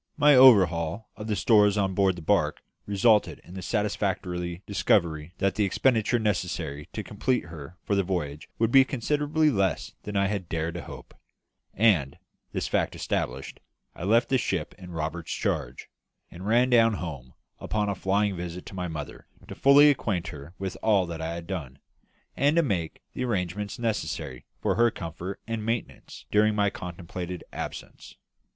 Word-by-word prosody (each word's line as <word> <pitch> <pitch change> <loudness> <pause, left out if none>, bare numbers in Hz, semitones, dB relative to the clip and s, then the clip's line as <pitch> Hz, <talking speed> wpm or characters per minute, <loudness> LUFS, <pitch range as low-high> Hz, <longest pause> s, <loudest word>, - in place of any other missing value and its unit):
My 145 -1 +6
overhaul 100 -6 +5
of 105 - -7
the 105 - 0
stores 105 -2 +4
on 95 -2 +1
board 95 -1 +2
the 85 - -9
barque 80 -5 +1 0.2
resulted 105 +2 +3
in 90 - -13
the 95 - -6
satisfactory 90 -3 -2
discovery 90 -4 +1
that 100 0 +1
the 105 - 0
expenditure 115 +3 +2
necessary 85 -8 -2
to 110 - -4
complete 125 +5 -1
her 85 0 -10
for - - -1
the 100 - +3
voyage 85 -6 -3
would 115 0 +1
be 135 +1 +8
considerably 150 +4 +1
less 100 -5 0
than 105 - -7
I 100 0 +3
had 95 -3 -3
dared 80 0 -2
to 85 - -5
hope; - - -11 0.6
and, 90 -11 +3 0.3
this - - -2
fact - - 0
established, - - -3 0.3
I - - -9
left 115 +5 +3
the 130 - +3
ship 90 -8 -2
in 90 -1 -10
Roberts's 80 0 -4
charge, - - -2 0.4
and 90 +3 -8
ran 120 +3 +3
down 115 -2 +5
home 70 -9 -7 0.2
upon 105 -1 -1
a 100 - 0
flying 100 +1 0
visit 90 0 -6
to - - -10
my 90 -1 -3
mother, 75 -3 -7 0.2
to - - -7
fully 145 +2 +7
acquaint 95 -10 -2
her 75 +2 -10
with 95 -1 -4
all 105 -4 +3
that 85 -2 -6
I 80 +1 -3
had 85 -1 -7
done, 80 -8 -5 0.6
and 145 +3 +2
to 170 - +4
make 90 - -2
the 125 - -3
arrangements 105 -1 -2
necessary 80 - -3 0.2
for - - +2
her 120 0 +4
comfort 90 0 -6
and 115 -1 -3
maintenance 115 +1 -4
during 105 0 +3
my 100 -1 +2
contemplated 90 -1 -6
absence. - - -7
95 Hz, 170 wpm, -27 LUFS, 85-110 Hz, 0.6 s, be